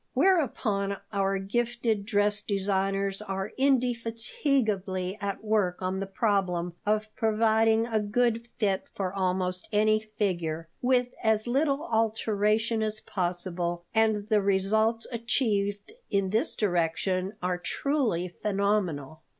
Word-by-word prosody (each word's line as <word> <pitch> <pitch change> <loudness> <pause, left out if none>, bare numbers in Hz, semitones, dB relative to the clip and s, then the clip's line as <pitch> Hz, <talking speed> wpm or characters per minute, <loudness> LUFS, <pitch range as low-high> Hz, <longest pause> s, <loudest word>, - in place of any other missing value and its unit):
Whereupon 240 - +2 0.2
our 195 0 +1
gifted 230 +1 -1
dress 205 -1 +2
designers 195 0 -1
are 195 -1 -4
indefatigably 230 - 0
at 200 +1 -3
work 210 -5 +1
on 185 +1 -2
the 195 - -3
problem 190 -4 0
of 215 0 0
providing 225 0 +3
a 225 -2 0
good 230 +2 0
fit 195 -4 0
for 190 -2 -2
almost 185 -1 -1
any 215 0 +3
figure, 180 -7 -2
with 250 -1 +2
as 220 -1 +2
little 275 +4 +1
alteration 220 0 +1
as 215 0 0
possible, 175 -2 -2
and 220 -2 +2
the 215 -2 +3
results 215 +4 +2
achieved 215 -4 -1 0.2
in 195 -2 0
this 220 +2 +2
direction 185 0 0
are 180 -1 -1
truly 235 - 0
phenomenal. 185 -7 -1
210 Hz, 115 wpm, -28 LUFS, 190-225 Hz, 0.2 s, providing